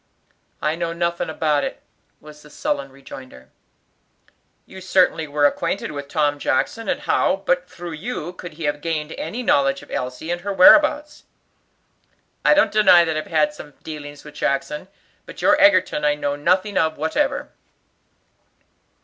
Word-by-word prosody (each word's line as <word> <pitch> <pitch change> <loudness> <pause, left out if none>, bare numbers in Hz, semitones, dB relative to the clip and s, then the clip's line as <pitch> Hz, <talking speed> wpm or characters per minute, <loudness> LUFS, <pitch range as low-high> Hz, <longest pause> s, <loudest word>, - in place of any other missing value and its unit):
"I 150 - +1
know 170 0 -3
nothing 170 -1 -2
about 150 -2 0
it," - - -5 0.4
was 150 0 -14
the 150 - -16
sullen 140 -2 -3
rejoinder. 130 - -13 1.1
"You 190 - -12
certainly 180 -4 +2
were 145 0 +1
acquainted 170 +6 -1
with 140 -1 -7
Tom 145 0 0
Jackson, 225 - -1
and - - -1
how, - - +1
but - - 0
through 175 -1 -8
you, 175 0 -5
could 180 -2 -10
he 160 +1 -9
have 145 0 -1
gained 160 -2 -3
any 225 +13 -5
knowledge 140 - +2
of - - -16
Elsie 125 +6 -4
and 175 0 -3
her 200 +2 -4
whereabouts?" 300 +5 +5 1.2
"I - - +5
don't 300 - +3
deny 190 -5 +6
that 160 -1 -2
I've 155 - -4
had 150 -2 +1
some 150 -1 -12
dealings 145 -2 -8
with 150 - -12
Jackson, 145 +5 -2 0.4
but - - -10
your 300 - +5
Egerton 185 -6 +4
I 150 0 +2
know 145 -1 -2
nothing 185 +7 +1
of 160 -1 0
whatever." 160 - -1
155 Hz, 160 wpm, -21 LUFS, 145-185 Hz, 1.2 s, deny